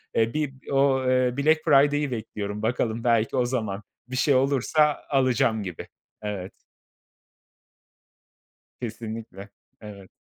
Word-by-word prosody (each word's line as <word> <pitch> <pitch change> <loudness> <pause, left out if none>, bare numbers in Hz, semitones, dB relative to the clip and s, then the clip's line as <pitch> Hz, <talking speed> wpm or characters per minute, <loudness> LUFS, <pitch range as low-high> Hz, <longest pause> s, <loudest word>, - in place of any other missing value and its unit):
E, 115 0 +2
bir 150 -3 -1 0.2
o 135 -1 +3
eee, 130 0 +2
Black 155 +2 +3
Friday'i 145 0 +4
bekliyorum. 105 -3 -5
Bakalım 115 0 -1
belki 115 -2 +2
o 125 - +2
zaman 110 -5 -3 0.2
bir 130 - -6
şey 140 +2 +3
olursa 140 +3 +2
alacağım 125 -5 +2
gibi. 90 -4 -7 0.3
Evet. 100 -3 -5 2.3
Kesinlikle. 110 -3 -7 0.3
Evet. 100 -3 -11
120 Hz, 110 wpm, -25 LUFS, 110-135 Hz, 2.3 s, Friday'i